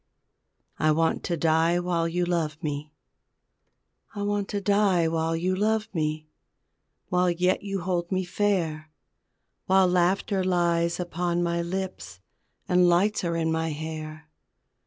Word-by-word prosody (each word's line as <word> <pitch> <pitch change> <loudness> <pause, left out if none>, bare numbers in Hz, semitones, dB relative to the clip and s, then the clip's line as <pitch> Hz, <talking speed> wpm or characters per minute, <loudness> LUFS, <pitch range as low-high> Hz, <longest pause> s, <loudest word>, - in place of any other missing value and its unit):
I 155 - +3
WANT 165 +1 +1
TO 170 - -2
DIE 165 +2 +2
WHILE 175 -2 0
YOU 175 +1 -1
LOVE 165 -4 -1
ME 150 0 -4 1.2
I 205 - -3
want 205 -1 -1
to 205 - -2
die 200 -4 +2
while 165 0 0
you 180 +3 0
love 215 +2 0
me, 155 -2 -2 0.8
While 180 0 +2
yet 180 +2 +1
you 195 -2 -3
hold 175 0 -2
me 185 0 0
fair, 175 -6 -1 0.8
While 190 0 +5
laughter 185 +2 +1
lies 170 -2 +1
upon 175 0 -1
my 170 0 0
lips 180 - -5 0.5
And 180 0 +4
lights 190 +5 +2
are 170 -1 -1
in 160 -1 0
my 160 0 0
hair. 155 0 -6
175 Hz, 135 wpm, -26 LUFS, 160-185 Hz, 1.2 s, While